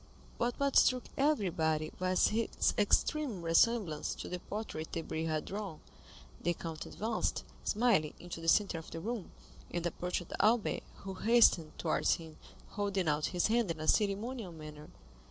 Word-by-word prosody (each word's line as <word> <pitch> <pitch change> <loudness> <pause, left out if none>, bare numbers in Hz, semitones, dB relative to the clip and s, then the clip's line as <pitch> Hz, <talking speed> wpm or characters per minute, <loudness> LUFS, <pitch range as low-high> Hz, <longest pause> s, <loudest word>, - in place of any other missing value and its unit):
But 240 0 -1
what 280 -1 +1
struck 250 -1 +5
everybody 175 - +1
was 185 0 +3
his 225 +1 +1
extreme 215 - +1
resemblance 165 -1 +2
to - - -7
the 180 - -4
portrait 190 -6 -5
Debray 160 -1 -3
had 155 -1 -1
drawn. 200 -5 -5 0.6
The 175 - 0
count 160 -2 -6
advanced, 220 +1 -2 0.2
smiling, 215 -9 +2
into 175 -1 -7
the 165 - -6
centre 185 -1 +3
of 160 - -11
the 165 - -6
room, 220 +2 -4 0.4
and 175 -1 -3
approached 180 +1 -2 0.2
Albert, 225 +2 +3 0.2
who 195 -1 -5
hastened 190 -6 +4
towards - - +2
him 160 -2 -11 0.3
holding 200 -3 -1
out 150 0 +1
his 180 -2 0
hand 230 -2 +2
in 165 -2 -3
a 155 - -4
ceremonial 210 +1 +1
manner. 155 -2 -10
185 Hz, 155 wpm, -33 LUFS, 165-220 Hz, 0.6 s, struck